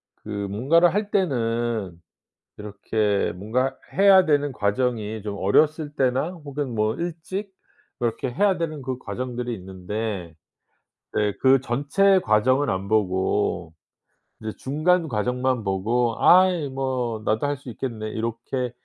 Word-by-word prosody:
그 - - -14 0.2
뭔가를 160 - +3
할 205 +1 -1
때는 115 - -1 0.6
이렇게 105 0 -1
뭔가 125 +8 -1 0.2
해야 195 -1 +6
되는 145 -2 +2
과정이 110 -1 -1
좀 105 -1 -5
어렸을 150 - +2
때나 130 +5 +1
혹은 140 -3 -4
뭐 110 +1 +1
일찍 175 +5 -5 0.5
이렇게 120 +2 -2
해야 195 +7 +2
되는 155 -4 -3
그 130 -1 -4
과정들이 125 -1 -4
있는데 95 -1 -5 0.9
예 105 -1 +1
그 135 0 +5
전체 145 +11 +2
과정은 130 +4 +2
안 95 +1 -3
보고 95 -4 0 0.7
이제 110 0 -4
중간 160 +5 +1
과정만 125 +1 -1
보고 110 +5 0
'아이 180 -5 +5
뭐 130 -4 -2
나도 110 +6 +1
할 145 0 -1
수 130 -1 -11
있겠네.' 110 -2 -5
이렇게 115 +3 -3
125 Hz, 245 characters per minute, -24 LUFS, 110-145 Hz, 0.9 s, 해야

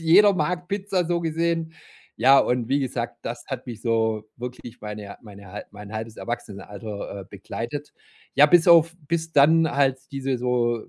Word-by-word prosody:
Jeder 195 +5 +6
mag 175 +2 -1
Pizza, 195 -2 -1
so 170 0 0
gesehen. 165 0 -1 0.4
Ja, 135 +4 +6
und 125 -2 +1
wie 140 +1 +2
gesagt, 120 -3 -3
das 120 +1 -5
hat 135 -2 -5
mich 115 -3 -7
so 110 -2 0
wirklich 120 -1 -8
meine 105 -1 -7
mein 100 -3 -13
hal 100 +3 -7
mein 105 0 -11
halbes 110 0 -5
Erwachsenenalter, 105 -2 -6
äh, - - -12
begleitet. 120 +8 -6 0.4
Ja, 140 - +7
bis 175 +2 +5
auf 165 -1 +6
bis 165 -1 -1
dann 160 +2 +5
halt 135 -2 +2
diese 135 -1 -2
so 120 -1 0
125 Hz, 165 wpm, -24 LUFS, 110-160 Hz, 0.4 s, Ja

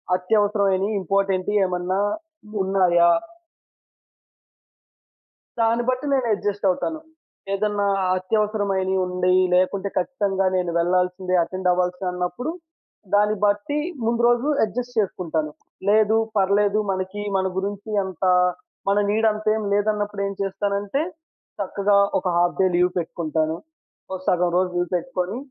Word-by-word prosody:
అత్యవసరమైనయి 200 0 +1
ఇంపార్టెంటియి 195 +2 +1
ఏమన్నా 180 +1 -1 0.6
ఉన్నాయా? 180 -3 +4 2.5
దాన్ని 230 +1 +2
బట్టి 255 +3 -1
నేను 260 -3 +1
అడ్జస్ట్ 205 0 -2
అవుతాను. 315 - -1 0.5
ఏదైనా 205 0 0 0.3
అత్యవసరమైనయి 195 -1 0
ఉండేయి 180 0 +2
లేకుంటే 185 +2 +1
ఖచ్చితంగా 195 -2 0
నేను 180 -2 0
వెళ్ళాల్సిందే 180 +1 +1
అటెండ్ 185 +1 -2
అవ్వాల్సిందే 180 +1 -1
అన్నప్పుడు. 180 - -3 0.6
దాన్ని 210 +1 +3
బట్టి 205 +8 0 0.3
ముందు 230 +1 +1
రోజు 240 +3 +2 0.2
అడ్జస్ట్ 245 +3 -5
చేసుకుంటాను. 160 -6 -2 0.4
లేదు 215 +1 +4 0.2
పర్లేదు 200 +2 +2
మనకి 190 +2 -4
మన 190 0 0
గురించి 200 +2 -4
అంత 190 -2 -7 0.7
మన 200 +1 +3
నీడ్ 220 +2 +2
అంత 215 0 -6
ఏం 220 - -2
లేదన్నప్పుడేం 205 -1 0
చేస్తానంటే, 200 +5 -1 0.6
చక్కగా 200 +1 +1 0.2
ఒక - - -16
హాఫ్ 175 0 +2
డే - - +5
లీవ్ 180 +1 +3
పెట్టుకుంటాను. 160 -2 -1 0.6
ఒక 190 - -3
సగం 180 0 +2
రోజు 185 0 +1
లీవ్ 175 -1 -1
పెట్టుకొని, 185 0 -3
195 Hz, 115 wpm, -23 LUFS, 180-210 Hz, 2.5 s, డే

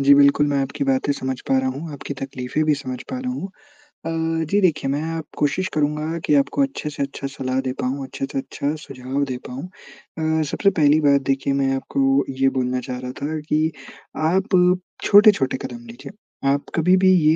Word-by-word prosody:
जी 140 +1 +6
बिल्कुल। 140 +1 +5
मैं 140 -1 +1
आपकी 140 +1 -3
बातें 135 +1 +1
समझ 130 -2 -4
पा 135 - +3
रहा 130 - 0
हूँ। 150 +4 -6
आपकी 140 0 -6
तकलीफ़े 135 +2 -2
भी 150 -1 +3
समझ 130 -3 -5
पा 260 - -3
रहा 255 0 -3
हूँ। 195 -6 -4 0.6
अ, 165 0 -1
जी, 205 - +3
देखिए 155 -6 +2
मैं 160 +3 -2 0.2
कोशिश 165 +6 +1
करूँगा 150 +2 -1
की - - +2
आपको 275 - -2
अच्छे 270 - -3
से 145 -1 -3
अच्छा 140 0 -5
सलाह 130 -1 -2
दे 130 - 0
पाऊँ, 130 +2 -2
अच्छे 135 +1 -4
से - - -4
अच्छा 140 +2 -3
सुझाव 135 0 -4
दे 125 - -2
पाऊँ। 130 +2 -6
अ, 160 -3 -4
सबसे 200 - +2
पहली 155 -4 +4
बात 140 -2 +4
देखिए 135 +1 0
मैं 135 -1 +1
आपको 135 +1 +1
ये 135 0 +2
बोलना 125 0 0
चाह 125 - -3
रहा 125 0 -5
था 155 +2 -2
कि 155 +1 +2 0.6
आप 185 -1 +3 0.3
छोटे-छोटे 200 -11 +5
कदम 240 0 -8
लीजिए। 230 -3 -10 0.4
आप 140 +1 +1
कभी-भी 185 +3 +4
ये 155 -1 +4
145 Hz, 195 wpm, -22 LUFS, 135-165 Hz, 0.6 s, जी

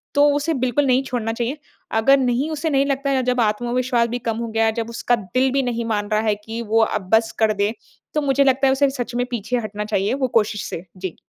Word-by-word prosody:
तो 285 0 +6
उसे 290 +3 0
बिल्कुल 260 +1 +1
नहीं 260 +1 +3
छोड़ना 230 -4 -2
चाहिए। 245 +5 -2 0.4
अगर 275 +5 +5
नहीं 255 +4 0
उसे 315 +1 -2
नहीं 275 -1 +2
लगता 275 0 -1
है 265 -1 +2
जब 250 0 +1
आत्मविश्वास 240 +2 +1
भी 245 +1 -3
कम 225 - -1
हो 235 0 -3
गया, 225 0 +2
जब 230 0 -4
उसका 235 +1 0
दिल 240 +5 0
भी 275 0 +2
नहीं 235 -2 -2
मान 205 0 -2
रहा 215 - +2
है 215 -2 +1
कि 225 +1 -5
वो 225 0 +5
अब 195 -3 -4
बस 225 0 +4
कर 220 -1 +3
दें, 205 +1 0 0.4
तो 300 - +1
मुझे 280 0 +2
लगता 270 0 +3
है 265 - +4
उसे 280 +1 +3
सच 245 -3 -5
में 245 0 0
पीछे 240 +2 -2
हटना 210 -2 -4
चाहिए 205 0 0
वो 265 -1 0
कोशिश 210 -1 -3
से। 170 +3 -6
जी। 185 -2 -5
240 Hz, 245 wpm, -21 LUFS, 220-270 Hz, 0.4 s, तो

